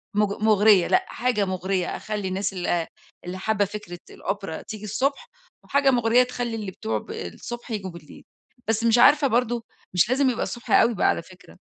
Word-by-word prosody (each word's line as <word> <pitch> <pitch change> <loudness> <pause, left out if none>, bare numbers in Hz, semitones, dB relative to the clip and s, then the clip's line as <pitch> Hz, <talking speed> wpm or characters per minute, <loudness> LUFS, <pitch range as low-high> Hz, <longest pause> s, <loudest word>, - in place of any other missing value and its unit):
مُغ 210 0 0
مُغرية، 210 -3 +5
لأ 380 - +2
حاجة 235 -5 0
مُغرية 185 -1 -2
أخلّي 210 -2 -4
الناس 195 +1 -2
ال 175 -2 -1 0.4
اللي 180 +1 -5
حابة 205 0 +1
فكرة 200 -3 -8
الأوبرا 195 -4 -5
تيجي 215 -1 -8
الصبح 265 +7 -1 0.4
وحاجة 280 -1 +3
مُغرية 240 0 +4
تخلّي 245 -2 -4
اللي 210 -4 -5
بتوع 110 -9 -3
ب - - -11
الصبح 235 - -7
ييجوا 195 -4 -4
بالليل، 170 -3 -13 0.4
بس 225 0 0
مش 230 0 +4
عارفة 290 +4 +6
برضه 240 -1 0 0.3
مش 180 +5 +3
لازم 265 +1 +3
يبقى 240 - -1
الصبح 240 - -6
أوي 235 - +5
بقى - - +2
على - - +1
فكرة، 180 +1 -17
210 Hz, 180 wpm, -24 LUFS, 190-240 Hz, 0.4 s, عارفة